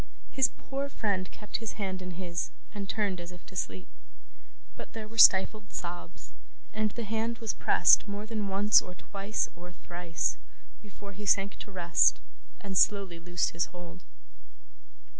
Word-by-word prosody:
His 265 -4 +4
poor 275 +1 -4
friend 195 -8 -1
kept 210 - -5
his 225 -2 -5
hand 190 -3 -4
in 180 -2 -7
his, 175 -2 -3 0.2
and 200 -2 -6
turned 200 -5 -1
as 175 +1 -8
if 180 -1 -14
to 185 - -14
sleep. 95 - -3 0.9
But - - -10
there 220 -1 -6
were 225 +1 -7
stifled 205 +1 +6
sobs; 175 0 -7 0.4
and 215 0 +1
the 235 +3 -5
hand 225 +2 -2
was 225 -2 -3
pressed - - +5
more 205 +1 -5
than 215 -2 -3
once, 200 +2 +5
or 180 - -10
twice, 200 +3 -2
or 175 +1 -10
thrice, 175 -2 -2 0.4
before 200 -1 -11
he 205 +2 -8
sank 195 +1 +3
to 205 - -9
rest, 175 -3 +4 0.4
and 195 -2 -6
slowly 195 -3 +3
loosed 175 0 0
his 170 0 0
hold. 175 -1 -11
195 Hz, 160 wpm, -30 LUFS, 180-215 Hz, 0.9 s, stifled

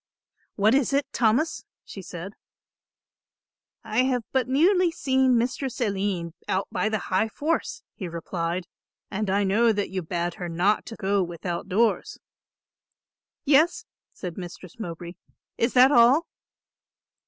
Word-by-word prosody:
"What 215 +3 +3
is 275 0 +2
it, 280 +1 +2
Thomas?" 240 +8 +1 0.2
she 195 - -9
said. 180 +2 -8 1.5
"I 220 +1 -1
have 250 -3 0
but 260 -1 +1
newly 350 +7 +4
seen 265 -5 +2
Mistress 255 +2 -2
Aline 195 -6 -1
out 190 +1 0
by 215 - 0
the 215 - 0 0.2
High 190 +4 +3
Force," 310 +8 -2
he 190 - -6
replied, 170 +1 -3 0.5
"and 210 0 -2
I 200 +2 +2
know 220 +4 +3
that 205 -3 -2
you 190 -1 -2
bade 175 +1 -2
her 175 - -3
not 180 +6 +1
to 225 - -7
go 200 -1 0
without 175 0 -4
doors." 220 +4 +1 1.3
"Yes," 300 +4 +3 0.3
said 180 -1 -7
Mistress 180 +2 -10
Mowbray. 175 -3 -6 0.5
"Is 230 +2 +1
that 255 +2 +7
all?" 260 +6 +5
215 Hz, 135 wpm, -25 LUFS, 180-255 Hz, 1.5 s, that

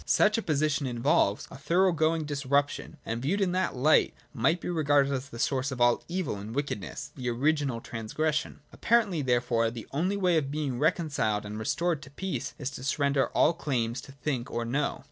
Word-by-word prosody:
Such 210 0 +3
a 225 - 0
position 150 -4 0
involves 115 -4 +1
a - - -9
thorough 180 +6 +3
going 160 0 +1
disruption, 140 0 -1
and, 115 +1 -3
viewed 170 +10 0
in 190 -3 +1
that 185 -4 0
light, 145 +5 +3 0.2
might 145 +7 +2
be - - -6
regarded 145 -5 +2
as 135 +1 -4
the 115 - -9
source 130 +3 0
of 130 - -5
all 120 0 +4
evil 175 - -2
and 105 +4 -7
wicked 140 -7 -2
ness—the 125 +6 -6
original 135 -1 0
transgression. 150 +10 -2
Apparently 220 -8 +2
therefore 120 -3 +1
the 115 -1 -8
only 180 +8 0
way 180 -4 +3
of 140 -3 0
being 140 -4 -2
reconciled 145 - +1
and 105 +1 -6
restored 165 +7 0
to 145 - -11
peace 190 +6 -4
is 140 -3 -4
to 130 - -8
surrender 140 0 +1
all 160 - +5
claims 125 -6 -2
to 135 - -12
think 135 -3 -3
or 120 0 -2
know. 140 +5 -1
140 Hz, 190 wpm, -28 LUFS, 120-160 Hz, 0.2 s, all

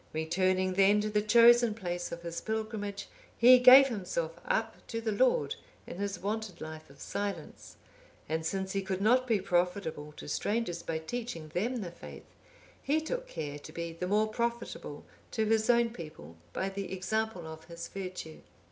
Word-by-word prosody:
Returning 185 +4 +1
then 200 +2 +5
to 215 0 -2
the 210 0 +2
chosen 235 +1 +6
place 175 -4 -4
of 170 0 -7
his 170 0 -4
pilgrimage, 215 -2 -4 0.3
he 250 +2 +8
gave 260 +2 +9
himself 180 -7 -2
up 225 0 -1
to 230 - -3
the 225 -1 -2
Lord 205 - +2 0.3
in - - -8
his 200 -1 -3
wonted 210 -2 -4
life 155 -1 -8
of 140 - -17
silence, 200 -1 -5 0.5
and 160 +1 -1
since 190 +3 -2
he 195 - -1
could 190 -1 -3
not 250 +5 +3
be 225 -4 +2
profitable 180 -5 -1
to - - -10
strangers 205 +2 -1
by 165 - -3
teaching 195 -1 -5
them 225 +9 -1
the 175 -4 -5
faith, - - -11 0.6
he 295 +3 +1
took - - -4
care 145 - -5
to 155 - -11
be 170 0 -5
the 180 +2 -4
more 210 +3 +2
profitable 235 +2 -4 0.2
to 220 -2 0
his 220 +1 +2
own 235 -1 +4
people 155 - -10 0.2
by 190 - -2
the 195 0 -5
example 190 0 -2
of 160 0 -9
his 170 0 -7
virtue. 185 -4 -7
195 Hz, 175 wpm, -31 LUFS, 170-225 Hz, 0.6 s, gave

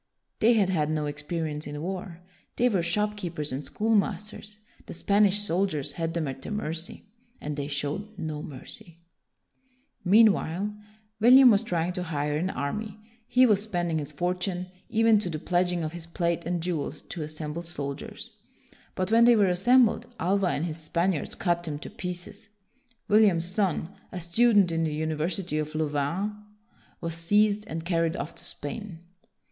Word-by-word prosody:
They 230 +3 +5
had 205 -5 +3
had 155 -5 +1
no 155 -1 -1
experience 150 +1 -4
in 145 0 -5
war. 180 +1 -5 0.3
They 245 - +3
were 195 -6 +1
shopkeepers 175 -4 -1
and 135 +3 -3
schoolmasters. 210 0 -1 0.3
The - - -7
Spanish 205 0 +3
soldiers 170 -7 0
had 165 +1 -3
them 165 -3 -1
at 135 0 -6
their - - -7
mercy, 170 -5 -4 0.4
and 150 0 -4
they 140 -1 -3
showed 150 +9 -3
no 155 -2 -4
mercy. 165 +6 -10 1.1
Meanwhile, 205 -1 +4 0.5
William 250 +3 +8
was 200 -1 +4
trying 180 -5 -1
to 180 - -3
hire 150 -3 -2
an 175 +5 0
army. 205 +7 -4 0.3
He 255 +1 +5
was 210 -4 +4
spending 175 -6 -1
his 145 0 -5
fortune, 180 +3 -2 0.2
even 225 -2 +4
to 185 - -4
the 155 - -3
pledging 175 +1 0
of 155 +1 -4
his 170 -1 -6
plate 170 0 -1
and 175 -1 -1
jewels, 160 -4 -3
to 170 - -6
assemble 155 +1 -4
soldiers. 140 -5 -5 0.6
But 185 +2 -2
when 230 +1 +6
they 240 0 +7
were 205 -3 +4
assembled 230 +7 +4
Alva 190 +2 +2
and 165 -2 0
his 160 -2 -4
Span 170 +3 0
iards 155 -6 -4
cut 175 -2 +1
them 155 -4 -4
to - - -9
pieces. 180 +4 -7 0.6
William's 205 -6 +4
son, 185 -3 0 0.2
a 180 - -5
student 200 +2 +4
in 165 0 0
the 155 -2 -1
University 160 +2 -2
of 155 0 -4
Louvain, 155 +7 -1 0.7
was 165 -1 -3
seized 205 +5 +3
and 160 +1 -5
carried 165 -2 +1
off 155 - -5
to - - -10
Spain. 170 +3 -6
175 Hz, 165 wpm, -27 LUFS, 155-205 Hz, 1.1 s, William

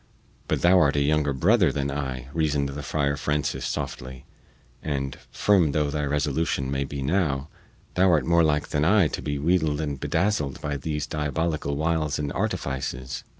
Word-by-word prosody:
"But - - -1
thou 90 +1 +6
art 70 -4 +3
a - - +2
younger 75 0 +2
brother 90 - +3
than 70 0 -2
I," 65 -3 -4
reasoned 75 -3 0
the 70 +1 -5
Friar 70 -1 0
Francis 75 -1 -1
softly; 65 +1 -5 0.6
"and, 70 -3 -3
firm 90 -8 +3
though 75 -1 +1
thy 75 0 -1
resolution 70 -1 -1
may 70 0 -1
be 70 0 -5
now, 70 -3 0 0.4
thou 95 +1 +4
art 75 -6 +3
more 85 0 +4
like 75 -2 +1
than 75 - 0
I 95 +1 +5
to - - -4
be 70 0 -2
wheedled 80 -1 +1
and 75 -3 -3
bedazzled 80 -5 0
by 75 -1 -3
these 75 +2 -3
diabolical 75 0 -2
wiles 80 -1 0
and 75 -1 -3
artifices. 65 -1 -3
75 Hz, 170 wpm, -25 LUFS, 70-80 Hz, 0.6 s, thou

